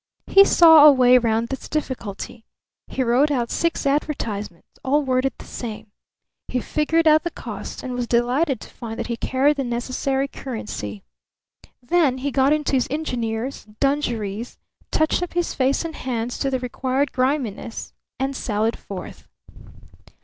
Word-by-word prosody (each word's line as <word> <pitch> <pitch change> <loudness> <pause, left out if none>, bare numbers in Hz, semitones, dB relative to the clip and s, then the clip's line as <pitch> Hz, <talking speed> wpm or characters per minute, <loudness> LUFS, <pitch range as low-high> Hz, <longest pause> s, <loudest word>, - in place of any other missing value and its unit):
He 395 - +7
saw 320 -5 +8
a - - +10
way 255 -2 +6
round 230 0 0
this 270 - -6
difficulty. 240 -6 -4 0.4
He 260 - -1
wrote 250 +5 +3
out 245 -5 -1
six 335 -3 -1
advertisements, 230 - -3
all 290 +3 +2
worded 260 -1 +1
the - - -12
same. 220 -3 -7 0.6
He 250 - -1
figured 315 +5 +1
out 310 0 +6
the 345 - -3
cost - - -7
and 255 - -4
was 245 -1 -2
delighted 250 +4 +1
to - - -10
find 225 -1 -7
that - - -2
he 235 - -3
carried 270 +5 +1
the 275 - 0
necessary 260 +3 -1
currency. 210 - -6 0.8
Then 280 -1 +2
he 280 +2 -2
got 270 +1 +3
into 300 -1 +1
his 260 -3 +2
engineer's 250 -4 -3
dungarees, 240 -6 -1 0.3
touched 315 +3 +1
up 355 - -4
his 350 0 -1
face 270 +4 +1
and 320 -2 -5
hands 240 -2 -3
to 275 - 0
the 260 - 0
required 255 +2 -1
griminess, 255 -4 -2 0.3
and 270 +1 -1
sallied 220 -1 -1
forth. 195 -2 -9
260 Hz, 155 wpm, -22 LUFS, 235-290 Hz, 0.8 s, a